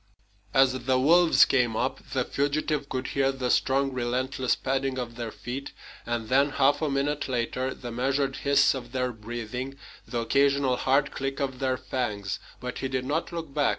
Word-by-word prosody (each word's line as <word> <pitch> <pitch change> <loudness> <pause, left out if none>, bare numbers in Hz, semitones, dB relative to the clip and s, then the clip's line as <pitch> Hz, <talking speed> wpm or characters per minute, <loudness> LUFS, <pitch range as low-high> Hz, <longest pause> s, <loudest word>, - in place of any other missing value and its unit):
As 135 +1 +5
the 130 -1 +4
wolves 165 +6 +6
came 120 -4 +2
up, 130 +4 -1
the 130 -2 +1
fugitive 145 0 -1
could 130 0 -3
hear 135 -1 +2
the 130 -2 -2
strong, 135 0 +2
relentless 130 +1 0
padding 135 0 -1
of 120 -2 -4
their 120 -1 -4
feet, 130 +5 -6 0.3
and 120 -2 -2
then, 140 +4 +4
half 140 +2 +2
a 155 - +1
minute 140 +1 -1
later, 125 +1 -1
the 120 -2 -7
measured 135 +3 0
hiss 140 0 +4
of 125 -2 -7
their 125 -1 0
breathing, 120 +4 -5 0.3
the 120 -2 -2
occasional 140 +1 +2
hard 135 +2 +2
click 135 0 -3
of 130 -2 -2
their 130 -1 0
fangs. 100 -8 -3 0.2
But 125 0 -5
he 135 - -2
did 130 -1 -2
not 155 +6 -1
look 165 -4 -6
back. 145 -1 +2
130 Hz, 180 wpm, -27 LUFS, 125-140 Hz, 0.3 s, wolves